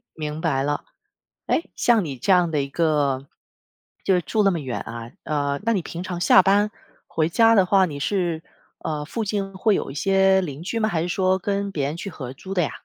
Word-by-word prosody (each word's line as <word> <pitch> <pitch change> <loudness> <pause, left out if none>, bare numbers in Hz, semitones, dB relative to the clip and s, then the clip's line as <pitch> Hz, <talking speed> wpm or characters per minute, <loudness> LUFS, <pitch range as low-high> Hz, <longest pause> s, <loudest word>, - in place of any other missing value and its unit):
明 155 0 -4
白 135 -5 +1
了， 145 +1 -1 0.6
诶， 330 - 0
像 230 -5 +3
你 140 -4 -5
这 195 - +2
样 180 -2 +4
的 150 -3 0
一 140 - -4
个， 140 -3 0 0.8
就 190 - +3
是 180 - +3
住 215 +5 0
那 195 - +4
么 170 -4 -2
远 130 -4 -4
啊 115 0 -7
呃， 145 -2 -1
那 230 - +2
你 195 -6 0
平 170 +1 -6
常 180 -2 -5
下 185 - +7
班 205 +2 +3 0.4
回 160 0 0
家 225 +5 +5
的 195 - +5
话， 190 0 +4
你 145 -4 -6
是， 170 -1 -1 0.4
呃， 150 -2 -3
附 220 +8 -3
近 200 -1 -2
会 205 +2 +2
有 - - -2
一 - - -8
些 190 +4 +3
邻 150 -2 -6
居 225 +6 -2
吗？ 215 -1 +1
还 165 -5 0
是 175 - -2
说 185 +1 +2
跟 200 +1 -2
别 145 -6 -1
人 150 +4 -3
去 195 +3 -6
合 130 -6 -7
租 190 +8 -9
的 180 - +2
呀？ 150 - -1
175 Hz, 245 characters per minute, -23 LUFS, 150-195 Hz, 0.8 s, 下